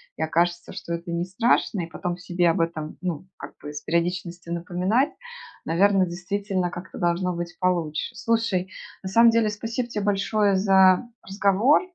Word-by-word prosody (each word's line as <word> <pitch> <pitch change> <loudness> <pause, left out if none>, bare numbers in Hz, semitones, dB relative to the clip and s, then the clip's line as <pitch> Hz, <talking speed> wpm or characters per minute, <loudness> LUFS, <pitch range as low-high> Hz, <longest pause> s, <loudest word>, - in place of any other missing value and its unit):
и - - -7
окажется, 175 +2 0
что 170 - -5
это 170 +1 -5
не 170 +1 -1
страшно, 205 0 +1
и 165 - -4
потом 175 +2 -4
себе 175 -1 +1
об 165 - 0
этом, 155 -2 -3
ну, 180 -2 -3
как - - -9
бы 150 0 -8
с 150 - -6
периодичностью 170 +1 -2
напоминать, 185 - +1 0.6
наверно, 190 +3 +3
действительно 185 +1 -2
как-то 175 +1 -9
должно 175 +1 +1
быть 175 +1 -5
получше. 175 0 -1
Слушай, 225 -5 0 0.3
на 190 - -5
самом 230 +3 +6
деле 225 -2 +2
спасибо 230 +3 -3
те 210 -3 -3
большое 205 0 +2
за 190 +2 +5 0.2
разговор. 200 +7 +3
180 Hz, 160 wpm, -24 LUFS, 170-205 Hz, 0.6 s, самом